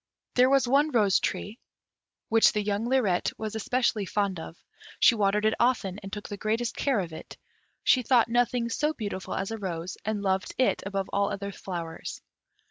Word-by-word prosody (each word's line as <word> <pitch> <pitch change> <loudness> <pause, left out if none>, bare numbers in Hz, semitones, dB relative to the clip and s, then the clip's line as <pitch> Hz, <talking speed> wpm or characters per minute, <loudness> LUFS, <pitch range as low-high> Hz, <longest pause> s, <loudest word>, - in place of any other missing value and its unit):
There 255 +1 +5
was 270 -2 +3
one 285 +4 +3
rose 210 -8 +3
tree, 210 +4 -3 0.7
which 225 0 +5
the 210 -1 0
young 210 +3 -1
Lirette 215 -9 +2
was 220 -1 -4
especially 220 -2 0
fond 200 -2 -1
of; 160 +1 -9 0.4
she - - +7
watered 210 -1 +1
it 215 - +3
often, 210 -6 +1
and 195 -1 -9
took 205 +1 -6
the 205 - -6
greatest 225 +3 -1
care 270 -6 +1
of 170 -3 -6
it; 160 - -10 0.5
she 255 - +4
thought 245 -1 +4
nothing 240 0 +1
so 300 +6 0
beautiful 200 -4 -4
as 195 +3 -3
a 225 - -4
rose, 175 -2 -5
and 210 -1 -2
loved 190 -1 -1
it 255 - +2
above 195 -1 -2
all 200 0 +2
other 200 0 -4
flowers. 170 -4 -6
210 Hz, 185 wpm, -27 LUFS, 195-240 Hz, 0.7 s, she